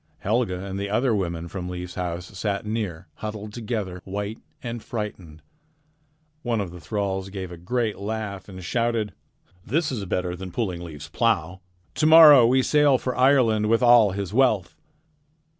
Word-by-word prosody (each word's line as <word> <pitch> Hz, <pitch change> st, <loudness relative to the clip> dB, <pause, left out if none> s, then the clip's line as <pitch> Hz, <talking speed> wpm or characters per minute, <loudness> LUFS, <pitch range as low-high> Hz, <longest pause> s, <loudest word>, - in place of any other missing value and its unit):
Helga 100 Hz, -4 st, -1 dB
and 95 Hz, 0 st, -5 dB
the 100 Hz, 0 st, -3 dB
other 120 Hz, +4 st, +1 dB
women 85 Hz, -4 st, -2 dB
from 90 Hz, 0 st, -6 dB
Leif's 90 Hz, 0 st, -6 dB
house 90 Hz, +1 st, -5 dB
sat 100 Hz, +1 st, -2 dB
near, 105 Hz, -6 st, -3 dB
huddled 105 Hz, -1 st, -6 dB
together, 105 Hz, -6 st, -4 dB
white 100 Hz, +3 st, -5 dB, 0.2 s
and 120 Hz, -1 st, -5 dB
frightened. 95 Hz, -, -6 dB, 1.0 s
One 120 Hz, -4 st, -1 dB
of 95 Hz, -4 st, -3 dB
the 90 Hz, -, -10 dB
thralls 95 Hz, +3 st, -3 dB
gave 95 Hz, -2 st, -6 dB
a -, -, -7 dB
great 110 Hz, +5 st, -2 dB
laugh 105 Hz, -2 st, -5 dB
and 95 Hz, -1 st, -9 dB
shouted: 115 Hz, 0 st, -1 dB, 0.5 s
"This 155 Hz, -, 0 dB
is 115 Hz, -6 st, -3 dB
better 90 Hz, -1 st, -2 dB
than 90 Hz, 0 st, -8 dB
pulling 90 Hz, -5 st, -3 dB
Leif's 80 Hz, -4 st, -8 dB
plow. 95 Hz, -6 st, 0 dB, 0.3 s
To 155 Hz, -, +1 dB
morrow 150 Hz, -6 st, +9 dB
we 130 Hz, +2 st, +3 dB
will 130 Hz, -, +3 dB
sail 145 Hz, -2 st, +4 dB
for 125 Hz, 0 st, -3 dB
Ireland 125 Hz, -5 st, +3 dB
with 115 Hz, +2 st, +3 dB
all 120 Hz, -3 st, +7 dB
his 100 Hz, 0 st, -4 dB
wealth." 110 Hz, -7 st, +2 dB
105 Hz, 165 wpm, -24 LUFS, 90-115 Hz, 1.0 s, morrow